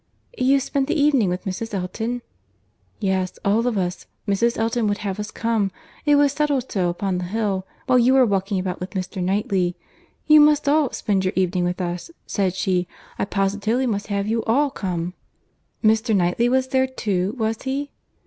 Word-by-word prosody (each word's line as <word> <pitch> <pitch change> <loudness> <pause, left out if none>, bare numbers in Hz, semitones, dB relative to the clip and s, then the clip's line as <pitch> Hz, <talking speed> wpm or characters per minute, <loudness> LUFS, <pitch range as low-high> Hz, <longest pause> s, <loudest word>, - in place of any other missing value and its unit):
"You 270 +2 +3
spent 270 0 -1
the 300 - 0
evening 280 -9 +3
with 180 +1 -3
Mrs. 205 +3 -4
Elton?" 225 +6 -3 0.8
"Yes, 190 -3 -1
all 220 +4 +2
of 235 -4 0
us; 180 -1 -2 0.2
Mrs. 230 +4 +1
Elton 225 0 0
would 205 0 0
have 195 0 -3
us 210 0 -4
come. 225 -4 0 0.4
It 295 - +6
was 285 -1 +4
settled 285 -3 0
so, 180 -3 +1
upon 180 +1 -2
the 180 - -3
hill, 195 -1 -2 0.2
while 255 -1 +4
we 240 +1 +4
were 260 -1 +6
walking 195 -1 0
about 185 -1 -3
with 180 +3 -7
Mr. 185 +1 -4
Knightley. 185 -1 0 0.5
'You 305 0 +7
must 300 -1 +4
all 295 -2 +3
spend 195 -3 0
your 185 - 0
evening 185 -1 +1
with 180 +1 -2
us,' 175 - -3 0.2
said 190 -3 -1
she—'I 180 0 -2
positively 205 +5 0
must 205 -4 -2
have 200 -1 -1
you 225 +2 0
all 275 +5 +2
come.'" 180 -7 -3 0.7
"Mr. 220 +1 +3
Knightley 185 +6 +2
was 260 +1 +1
there 260 0 +2
too, 200 -6 -1
was 220 -1 -1
he?" 280 +2 -3
210 Hz, 180 wpm, -22 LUFS, 185-250 Hz, 0.8 s, You